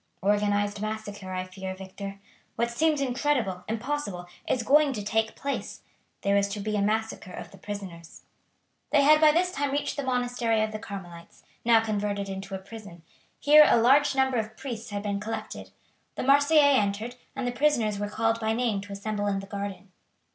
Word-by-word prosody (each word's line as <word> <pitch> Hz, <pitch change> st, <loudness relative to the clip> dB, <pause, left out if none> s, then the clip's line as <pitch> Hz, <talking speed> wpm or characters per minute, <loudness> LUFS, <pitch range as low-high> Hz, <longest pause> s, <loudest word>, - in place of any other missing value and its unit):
"Organized 205 Hz, 0 st, +1 dB
massacre, 210 Hz, -3 st, -5 dB
I 185 Hz, 0 st, -2 dB
fear, 185 Hz, 0 st, -7 dB
Victor. 195 Hz, +1 st, -8 dB, 0.4 s
What 235 Hz, +1 st, 0 dB
seemed 305 Hz, +3 st, +1 dB
incredible, 250 Hz, -8 st, 0 dB
impossible, 225 Hz, -5 st, -3 dB, 0.2 s
is 245 Hz, -, 0 dB
going 290 Hz, +2 st, +4 dB
to 210 Hz, -4 st, -4 dB
take 220 Hz, +1 st, 0 dB
place; 280 Hz, 0 st, -4 dB, 0.4 s
there 200 Hz, 0 st, +2 dB
is 200 Hz, 0 st, +3 dB
to 205 Hz, +1 st, -5 dB
be 210 Hz, +1 st, -2 dB
a 205 Hz, -, +1 dB
massacre 215 Hz, -2 st, -1 dB
of -, -, -8 dB
the 195 Hz, -, -15 dB
prisoners." 185 Hz, -5 st, -8 dB, 0.7 s
They 290 Hz, -2 st, +5 dB
had 305 Hz, +2 st, +6 dB
by 310 Hz, -1 st, +8 dB
this 355 Hz, +3 st, +1 dB
time 285 Hz, -4 st, -1 dB
reached 285 Hz, +1 st, -2 dB
the 285 Hz, -, -2 dB
monastery 245 Hz, -3 st, 0 dB
of 215 Hz, -, -2 dB
the 215 Hz, -, -5 dB
Carmelites, 175 Hz, -5 st, -10 dB, 0.2 s
now 230 Hz, -1 st, +5 dB
converted 205 Hz, -2 st, -2 dB
into 195 Hz, 0 st, -5 dB
a -, -, -2 dB
prison. 190 Hz, -3 st, -11 dB, 0.4 s
Here 300 Hz, +1 st, +8 dB
a -, -, +5 dB
large 270 Hz, +5 st, +4 dB
number 265 Hz, -1 st, +2 dB
of 220 Hz, -1 st, -3 dB
priests 240 Hz, -3 st, -6 dB
had 205 Hz, -1 st, -4 dB
been 200 Hz, -1 st, -2 dB
collected. 220 Hz, +2 st, -6 dB, 0.5 s
The -, -, -3 dB
Marseillais 285 Hz, +1 st, +5 dB
entered, 210 Hz, +4 st, -2 dB, 0.2 s
and 265 Hz, -2 st, -3 dB
the -, -, 0 dB
prisoners 240 Hz, -6 st, +1 dB
were 205 Hz, 0 st, -2 dB
called 225 Hz, +1 st, 0 dB
by 220 Hz, -1 st, 0 dB
name 225 Hz, -4 st, 0 dB
to 200 Hz, 0 st, -9 dB
assemble 205 Hz, +1 st, -3 dB
in 195 Hz, -1 st, 0 dB
the 195 Hz, -, -7 dB
garden. 200 Hz, -1 st, -6 dB
215 Hz, 185 wpm, -27 LUFS, 200-255 Hz, 0.7 s, by